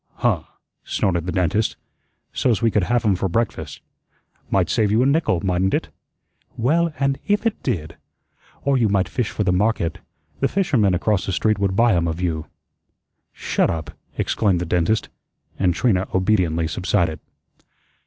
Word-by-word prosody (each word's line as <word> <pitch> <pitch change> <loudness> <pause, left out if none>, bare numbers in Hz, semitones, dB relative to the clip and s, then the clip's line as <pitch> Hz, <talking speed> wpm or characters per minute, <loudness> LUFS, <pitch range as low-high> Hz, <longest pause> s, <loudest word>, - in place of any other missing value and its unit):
"Huh!" - - 0 0.4
snorted 85 -2 -1
the - - -1
dentist, 95 +4 0 0.6
"so's 120 -6 +1
we 115 -1 +2
could 100 -3 +2
have 120 +2 +1
'em 100 -3 +3
for 95 +1 -1
breakfast. 115 +6 -2 0.7
Might 95 -3 +2
save 105 +4 +1
you 110 +4 +3
a - - +2
nickel, 140 - +2
mightn't 95 +1 +1
it?" - - -2 0.7
"Well, 165 +8 +2
and 135 0 +1
if 205 +2 +1
it 225 - 0
did! 80 -3 -3 0.7
Or 140 -2 +2
you 110 -3 +3
might 100 -1 +2
fish 125 -4 -2
for 105 - -2
the 90 -2 +2
market. 100 -3 0 0.4
The - - +2
fisherman 125 - +2
across 100 +1 0
the - - 0
street 110 +2 +1
would 100 -1 0
buy 115 +1 +4
'em 85 -1 +1
of 80 0 -3
you." 80 -3 -2 0.8
"Shut - - 0
up!" 80 -4 -3 0.3
exclaimed 100 -5 +1
the 90 - -2
dentist, 90 +6 +1 0.5
and 95 -2 +3
Trina 95 -6 +1
obediently 90 -4 +2
subsided. 85 -1 0
100 Hz, 165 wpm, -22 LUFS, 90-115 Hz, 0.8 s, buy